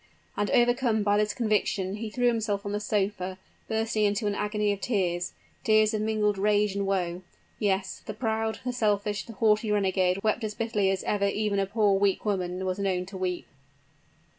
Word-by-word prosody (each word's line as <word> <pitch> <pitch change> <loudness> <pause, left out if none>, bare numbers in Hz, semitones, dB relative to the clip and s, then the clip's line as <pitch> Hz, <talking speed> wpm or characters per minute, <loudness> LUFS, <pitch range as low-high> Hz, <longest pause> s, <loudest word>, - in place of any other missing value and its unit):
And 205 - 0
overcome 240 -2 +3
by 205 0 +3
this 210 0 +2
conviction, 205 -4 0
he 220 0 -4
threw 245 +3 -1
himself 215 -4 +1
on 200 - -3
the 205 - -1
sofa, 195 -3 -1 0.3
bursting 220 -1 0
into 205 +1 +1
an 205 - +1
agony 210 0 0
of 200 -1 -4
tears 180 -6 -1 0.3
tears 215 0 +4
of 215 - 0
mingled 210 -2 +1
rage 210 0 +2
and 200 0 -2
woe. 180 -2 -1 0.4
Yes; 190 -2 -1
the - - -6
proud, 220 -2 -1
the 250 - -1
selfish, 210 -3 0
the 230 - -8
haughty 215 +1 +2
renegade 190 -2 +1
wept 220 +2 +1
as 210 -1 -3
bitterly 215 -4 0
as 190 -1 -1
ever 200 -1 +1
even 205 0 0
a 195 - 0
poor, 205 -1 +2
weak 200 0 +1
woman 185 -2 -1
was 185 +1 -2
known 185 -2 0
to 190 +1 -8
weep! 180 -1 -2
205 Hz, 190 wpm, -27 LUFS, 195-215 Hz, 0.4 s, tears